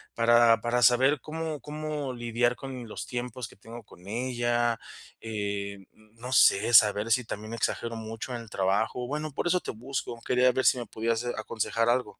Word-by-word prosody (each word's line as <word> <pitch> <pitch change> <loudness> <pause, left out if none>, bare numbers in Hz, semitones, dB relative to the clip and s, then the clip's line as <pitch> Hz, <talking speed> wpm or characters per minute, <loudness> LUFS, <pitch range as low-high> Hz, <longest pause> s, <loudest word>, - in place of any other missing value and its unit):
para 115 -1 +5
para 120 +2 0
saber 130 +4 +4
cómo 155 -2 -5
cómo 150 -2 -4
lidiar 120 0 0
con 130 -3 -7
los - - -6
tiempos 125 -1 -5
que - - -17
tengo 115 +3 -11
con 90 -1 -17
ella, 120 0 0 0.4
eh, 100 -2 -3
n 95 -1 -17 0.3
no 125 +3 -6
sé, 115 0 +5
saber 105 0 +6
si 125 -1 +1
también 110 +2 -6
exagero 115 0 -2
mucho 115 +3 -6
en 120 - -5
el 115 - -12
trabajo, 100 +6 0
bueno, 150 +2 -3
por 175 - -2
eso 180 +1 +2
te - - -5
busco. 120 0 -5
Quería 125 0 +4
ver 130 +1 -1
si - - +5
me 120 - -5
podías, 115 +1 -1
eh, 120 - -2
aconsejar 115 +1 -1
algo. 120 -3 0
120 Hz, 185 wpm, -28 LUFS, 115-125 Hz, 0.4 s, saber